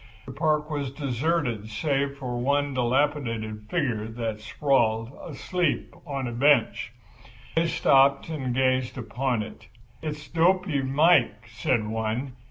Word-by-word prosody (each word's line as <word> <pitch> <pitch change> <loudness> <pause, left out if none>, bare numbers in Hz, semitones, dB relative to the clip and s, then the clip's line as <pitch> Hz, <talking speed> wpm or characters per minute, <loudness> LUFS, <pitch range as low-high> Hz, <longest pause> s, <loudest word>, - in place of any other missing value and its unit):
The 130 - -7
park 150 +1 +1
was 145 -3 -3
deserted 135 -4 -1
save 140 +4 -1
for 125 -3 -4
one 140 +2 +1
dilapidated 120 -5 -1
figure 125 -11 -1
that 110 -1 -4
sprawled, 115 -2 +1
asleep, 175 +3 -2
on 135 -2 -3
a - - -4
bench. 125 -3 +2 0.6
They 165 +1 +3
stopped 140 -3 +4
and 145 -6 -3
gazed 130 0 +1
upon 120 0 -1
it. - - -11 0.3
"It's 150 -1 -5
Dopy 175 -3 +2
Mike," 135 -5 +3
said 115 0 0
one. 110 +4 -2
135 Hz, 125 wpm, -26 LUFS, 115-150 Hz, 0.6 s, stopped